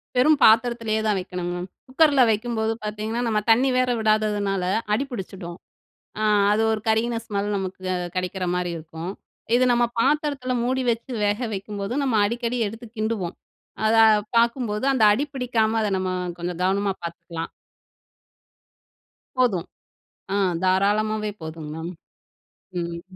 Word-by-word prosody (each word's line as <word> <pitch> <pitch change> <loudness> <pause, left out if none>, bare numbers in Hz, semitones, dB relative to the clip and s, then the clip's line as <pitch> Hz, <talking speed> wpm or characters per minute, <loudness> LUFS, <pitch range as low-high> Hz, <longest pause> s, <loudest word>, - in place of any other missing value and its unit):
வெறும் 295 +4 +5
பாத்திரத்திலேயே 225 -1 +4
தான் 210 -2 +2
வைக்கணும்மேம். 180 0 -4 0.2
குக்கர்ல 280 0 +4
வைக்கும்போது 220 0 -1
பார்த்தீங்கன்னா 215 +2 -3
நம்ம 215 -2 +2
தண்ணி 250 +4 +5
வேற 255 0 +2
விடாததுனால 210 -3 +1 0.3
அடி 245 - +1
புடிச்சிடும். 185 -5 -7 0.6
அ - - 0 0.3
அது 220 +1 +2
ஒரு 220 - -1
கருகின 225 +2 +2
ஸ்மெல் 205 -2 -2
நமக்கு 190 -1 -4 0.3
கெடைக்கிற 185 +1 -2
மாரி 180 -1 -1
இருக்கும். 165 +2 -7 0.4
இது 250 +1 +4
நம்ம 240 0 +3
பாத்திரத்தில 285 -1 +1
மூடி 260 +1 0
வச்சு 235 +3 -3
வேக 205 +1 +1 0.2
வைக்கும்போது 200 +2 -4
நம்ம 265 -4 0
அடிக்கடி 235 +2 -1
எடுத்து 225 +3 -7
கிண்டுவோம். 215 -5 -2 0.5
அத 225 +1 +3 0.4
பார்க்கும்போது 235 -1 +1
அந்த 260 -4 +1
அடி 270 +8 +1
பிடிக்காம 230 -4 +1
அத 215 - +1
நம்ம 185 0 -2 0.3
கொஞ்சம் 175 0 -4
கவனமா 195 +1 +1
பார்த்துக்கலாம். 170 0 -6 1.9
போதும். 210 -9 +1 0.7
ஆ - - +2 0.3
தாராளமாவே 210 +3 +1
போதுங்க 160 -1 -7
மேம் 165 +2 -5 0.9
ம். 170 0 -4
215 Hz, 125 wpm, -24 LUFS, 185-235 Hz, 1.9 s, வெறும்